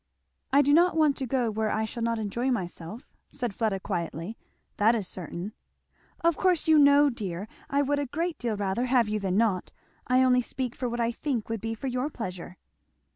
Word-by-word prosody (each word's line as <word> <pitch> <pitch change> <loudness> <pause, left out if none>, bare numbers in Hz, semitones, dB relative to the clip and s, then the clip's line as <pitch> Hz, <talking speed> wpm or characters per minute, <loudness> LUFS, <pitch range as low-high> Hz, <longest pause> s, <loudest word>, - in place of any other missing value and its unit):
"I 280 +2 +6
do 285 +1 +3
not 340 +1 +4
want 305 -3 +4
to 265 - -3
go 245 -2 0
where 215 0 -1
I 220 +1 0
shall 235 +2 -6
not 230 0 0
enjoy 225 +4 -1
myself," 190 -1 -4 0.2
said 245 -6 -3
Fleda 210 -2 0
quietly; 175 +1 -4 0.4
"that 220 +3 +4
is 205 -5 -2
certain." 180 +3 -5 0.7
"Of 335 -1 +3
course, 365 -4 +2
you 315 -1 +6
know, 285 0 +6
dear, 200 -4 -5 0.2
I 280 0 +2
would 285 +1 0
a 285 - -2
great 330 +5 -2
deal 230 -3 -2
rather 200 +4 0
have 245 -3 +3
you 210 0 -1
than 190 -1 -1
not 210 -5 +1 0.4
I 255 +1 +4
only 250 -1 +4
speak 250 0 -3
for 250 -2 -3
what 240 +1 -3
I 235 0 +1
think 240 -3 -3
would 225 -3 -3
be 225 +1 -3
for 225 - -8
your 255 +2 -1
pleasure." 185 - -6
235 Hz, 205 wpm, -27 LUFS, 210-275 Hz, 0.7 s, I